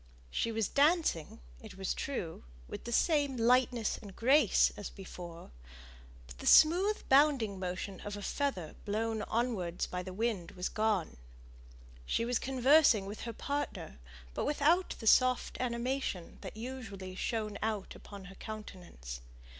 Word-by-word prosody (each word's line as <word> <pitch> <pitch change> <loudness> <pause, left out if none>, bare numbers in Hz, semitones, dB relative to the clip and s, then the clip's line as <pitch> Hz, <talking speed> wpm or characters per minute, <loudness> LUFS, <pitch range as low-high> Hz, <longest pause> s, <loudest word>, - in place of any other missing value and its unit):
She 230 - 0
was 220 -3 0
dancing, 290 - +2 0.2
it - - -11
was 190 -1 -1
true, 185 -12 -4 0.2
with - - -8
the 235 - -4
same 285 0 +2
lightness 240 -1 +2
and 200 -3 -11
grace 260 -2 +4
as 205 - -6
before, 175 -3 -10 0.7
but - - -13
the - - -5
smooth 370 +7 +5
bounding 265 -8 +4
motion, 185 +1 -4
as 205 0 -6
of - - -7
a - - -7
feather 230 - -2
blown 220 +1 -1
onwards 215 -8 -1
by 180 - -4
the 185 +1 -7
wind, 205 -3 -2
was 180 0 -3
gone. 215 - 0 0.9
She 230 - 0
was 245 0 0
conversing 265 -4 +4
with 205 +2 -7
her - - -5
partner, 280 - -4 0.3
but - - -2
without 305 +5 +2
the 225 - -9
soft 255 +3 +3
animation 240 -6 -2
that - - -8
usually 220 -6 -7
shone 215 +1 -3
out 215 -3 -2
upon 200 -2 -11
her 195 - -11
countenance. 175 - -8
220 Hz, 145 wpm, -32 LUFS, 190-260 Hz, 0.9 s, smooth